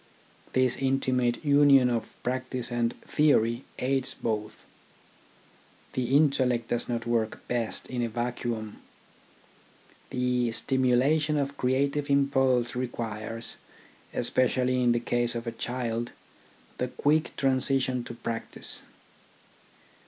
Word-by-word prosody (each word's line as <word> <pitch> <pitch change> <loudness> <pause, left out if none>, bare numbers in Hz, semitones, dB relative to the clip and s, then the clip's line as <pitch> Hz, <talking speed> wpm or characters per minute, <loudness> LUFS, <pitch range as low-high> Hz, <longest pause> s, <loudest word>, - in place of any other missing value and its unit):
This 130 -1 +2
intimate 130 -1 0
union 140 -3 +6
of 120 -2 -2
practice 130 -1 -3
and 120 0 -1
theory 125 -5 +2
aids 135 0 0
both. 110 -2 -4 1.3
The 130 +2 +2
intellect 130 -6 +2
does 120 - -1
not 120 -1 -2
work 115 -2 -1
best 120 -2 -2
in 125 -1 -3
a 120 - 0
vacuum. 120 -2 -3 1.3
The 125 -1 +1
stimula 130 +5 +2
tion 150 0 0
of 140 0 -1
creative 140 +3 0
impulse 135 -4 +2
requires, 115 -2 -4 0.5
especially 130 0 +1
in 120 -1 +4
the 120 - +2
case 120 0 0
of 115 0 -4
a 115 - -2
child, 120 0 -3 0.7
the 125 - 0
quick 155 +5 +1
transition 130 -1 +1
to 120 - -7
practice. 115 -1 -4
125 Hz, 110 wpm, -28 LUFS, 120-135 Hz, 1.3 s, union